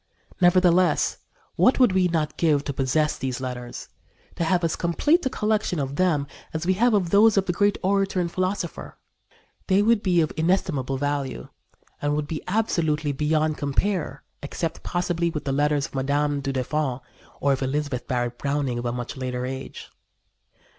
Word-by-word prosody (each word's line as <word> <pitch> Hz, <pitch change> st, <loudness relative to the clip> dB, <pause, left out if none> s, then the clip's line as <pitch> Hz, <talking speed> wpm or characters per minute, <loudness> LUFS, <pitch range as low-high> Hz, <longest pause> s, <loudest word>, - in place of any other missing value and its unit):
Nevertheless, 180 Hz, 0 st, +4 dB, 0.4 s
what 255 Hz, -, +4 dB
would 250 Hz, -5 st, +5 dB
we 185 Hz, -1 st, +3 dB
not 155 Hz, -3 st, -1 dB
give 150 Hz, -4 st, +2 dB
to 140 Hz, -, -3 dB
possess 145 Hz, +3 st, +1 dB
these 130 Hz, -1 st, -3 dB
letters 125 Hz, -2 st, -6 dB, 0.5 s
to -, -, -1 dB
have 175 Hz, +1 st, +1 dB
as 165 Hz, -, +1 dB
complete 295 Hz, -, +2 dB
a -, -, 0 dB
collection 215 Hz, -6 st, 0 dB
of 140 Hz, -1 st, -3 dB
them 165 Hz, -6 st, +2 dB, 0.3 s
as 160 Hz, +2 st, -2 dB
we 185 Hz, -, +3 dB
have 230 Hz, +4 st, +3 dB
of 180 Hz, -5 st, 0 dB
those 210 Hz, +1 st, +5 dB
of 195 Hz, -, +3 dB
the 175 Hz, -, -1 dB
great 205 Hz, +2 st, +2 dB
orator 195 Hz, 0 st, +1 dB
and 170 Hz, -1 st, -1 dB
philosopher. 185 Hz, +3 st, -3 dB, 0.7 s
They 195 Hz, +1 st, +4 dB
would 225 Hz, -1 st, +3 dB
be 180 Hz, -4 st, +2 dB
of 155 Hz, -, -1 dB
inestimable 160 Hz, -6 st, 0 dB
value 140 Hz, -, -3 dB, 0.5 s
and 145 Hz, 0 st, 0 dB
would 150 Hz, 0 st, -1 dB
be 155 Hz, -1 st, -4 dB
absolutely 160 Hz, -8 st, 0 dB
beyond 155 Hz, +2 st, 0 dB
compare, 160 Hz, +5 st, -1 dB, 0.2 s
except, 160 Hz, +3 st, -4 dB
possibly, 175 Hz, -1 st, -1 dB
with 155 Hz, -3 st, -5 dB
the 135 Hz, -, -1 dB
letters 145 Hz, +1 st, +1 dB
of -, -, -11 dB
Mme. 140 Hz, +2 st, 0 dB
du 140 Hz, 0 st, -2 dB
Deffand 135 Hz, 0 st, -1 dB, 0.4 s
or 140 Hz, 0 st, +2 dB
of 135 Hz, -, -3 dB
Elizabeth 135 Hz, -2 st, -2 dB
Barrett 120 Hz, -1 st, -2 dB
Browning 140 Hz, -4 st, -1 dB
of 120 Hz, -, -5 dB
a -, -, 0 dB
much 120 Hz, 0 st, -5 dB
later 125 Hz, -1 st, -3 dB
age. 130 Hz, +1 st, -7 dB
155 Hz, 175 wpm, -24 LUFS, 135-185 Hz, 0.7 s, would